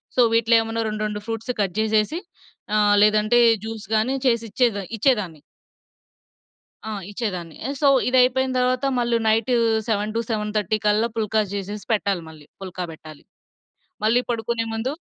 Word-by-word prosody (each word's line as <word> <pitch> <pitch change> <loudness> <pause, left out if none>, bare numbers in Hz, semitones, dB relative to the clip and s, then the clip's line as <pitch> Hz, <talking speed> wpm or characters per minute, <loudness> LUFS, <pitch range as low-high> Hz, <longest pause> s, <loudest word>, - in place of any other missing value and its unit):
So, 250 - +4
వీటిలో 230 0 +4
ఏమన్నా 225 0 -2
రెండు, 215 0 -3
రెండు 210 0 -5
ఫ్రూట్సు 225 +2 -3
కట్ 195 -3 -2
జేసేసి 220 +9 +1 0.6
ఆహ్, 205 -1 +4
లేదంటే 215 +3 +3 0.3
జ్యూస్ 220 -1 -6
గానీ 250 +5 0
చేసిచ్చేద 230 -1 +1 0.2
ఇచ్చేదాన్ని. 205 - 0 1.5
ఆ! - - -4 0.2
ఇచ్చేదాన్ని. 185 -7 -5
ఆహ్, 280 - -4
సో, 285 - +4 0.2
ఇదైపోయిన 260 +1 +3
తరవాత 250 +1 +1
మళ్ళీ 235 -1 +1
నైటూ 225 +3 +2 0.3
7-7:30 215 0 -1
కల్లా 215 +3 +2
పుల్కా 220 0 +1
జేసేసి 205 0 -5
పెట్టాలి 200 -4 0
మళ్ళీ. 155 -2 -14
పుల్కా 185 -1 -5
బెట్టాలి. 155 -1 -13 0.8
మళ్ళీ 235 +3 +3
పడుకునే 230 0 -2
ముందు 240 +5 -2
220 Hz, 130 wpm, -22 LUFS, 205-235 Hz, 1.5 s, సో